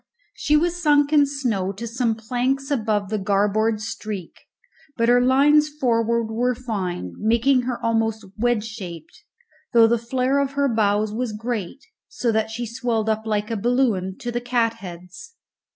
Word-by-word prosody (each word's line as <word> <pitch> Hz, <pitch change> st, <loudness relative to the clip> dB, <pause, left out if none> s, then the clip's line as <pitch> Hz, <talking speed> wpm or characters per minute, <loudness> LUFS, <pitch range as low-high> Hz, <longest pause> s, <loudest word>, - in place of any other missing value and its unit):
She 300 Hz, -, +2 dB
was 350 Hz, +2 st, 0 dB
sunk 290 Hz, -2 st, +3 dB
in 290 Hz, -2 st, +5 dB
snow 235 Hz, -9 st, -1 dB
to 215 Hz, +5 st, -7 dB
some 235 Hz, 0 st, -1 dB
planks 255 Hz, +5 st, -2 dB
above 215 Hz, -6 st, 0 dB
the 215 Hz, 0 st, -1 dB
garboard 210 Hz, +2 st, +1 dB
streak, 210 Hz, -4 st, -6 dB, 0.6 s
but 230 Hz, 0 st, +2 dB
her 245 Hz, 0 st, +5 dB
lines 290 Hz, +4 st, +4 dB
forward 235 Hz, -5 st, 0 dB
were 245 Hz, +2 st, +1 dB
fine, 190 Hz, -, -4 dB
making 235 Hz, +4 st, +3 dB
her 245 Hz, -, -3 dB
almost 225 Hz, -1 st, 0 dB
wedge 235 Hz, -1 st, +1 dB
shaped, 190 Hz, -, -9 dB, 0.5 s
though 230 Hz, -1 st, +7 dB
the 230 Hz, +1 st, +2 dB
flair 255 Hz, +4 st, 0 dB
of 275 Hz, -1 st, -1 dB
her 280 Hz, 0 st, +1 dB
bows 210 Hz, -2 st, +1 dB
was 235 Hz, 0 st, -2 dB
great, 225 Hz, -, -4 dB, 0.2 s
so 235 Hz, -, -1 dB
that 220 Hz, 0 st, 0 dB
she 240 Hz, +2 st, -4 dB
swelled 230 Hz, -2 st, -2 dB
up 220 Hz, 0 st, -1 dB
like 210 Hz, +1 st, -1 dB
a -, -, 0 dB
balloon 220 Hz, -5 st, 0 dB
to 240 Hz, -, -3 dB
the 240 Hz, 0 st, -2 dB
catheads. 230 Hz, -, -3 dB
230 Hz, 160 wpm, -22 LUFS, 215-255 Hz, 0.6 s, though